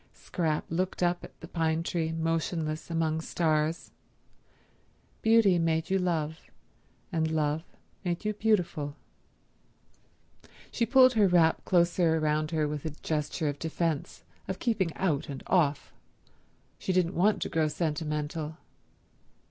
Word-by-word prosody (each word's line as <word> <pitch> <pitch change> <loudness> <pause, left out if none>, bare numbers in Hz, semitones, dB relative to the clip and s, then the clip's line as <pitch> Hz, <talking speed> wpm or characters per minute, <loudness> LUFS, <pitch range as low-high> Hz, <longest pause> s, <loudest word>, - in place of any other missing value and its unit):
Scrap 160 -4 -2
looked 180 +2 -1
up 175 0 +1
at - - -12
the - - -8
pine 160 -1 0
tree 165 -2 -1
motionless 165 -1 -2
among 160 -1 0
stars. 160 -1 0 1.3
Beauty 220 -5 +5
made 160 +1 0
you 195 - +3
love, 160 -3 -1 0.7
and 160 -2 0
love 155 0 0 0.4
made 175 +2 -2
you 215 - +1
beautiful... 180 -9 0 1.8
She 235 - 0
pulled 255 +1 +6
her 215 -4 +4
wrap 170 -3 +3
closer 170 -2 +3
round 155 0 0
her 155 -2 0
with 150 -1 -4
a 160 - -2
gesture 155 +1 -2
of 145 -1 -3
defence, 165 -2 -2 0.2
of 190 0 -3
keeping 205 -8 0
out 155 -8 -1
and 135 -2 -6
off. 150 -6 +1 0.9
She - - -2
didn't 180 -1 +2
want 205 +5 +3
to - - -4
grow 160 -1 +1
sentimental. 150 0 -3
165 Hz, 130 wpm, -29 LUFS, 155-180 Hz, 1.8 s, pulled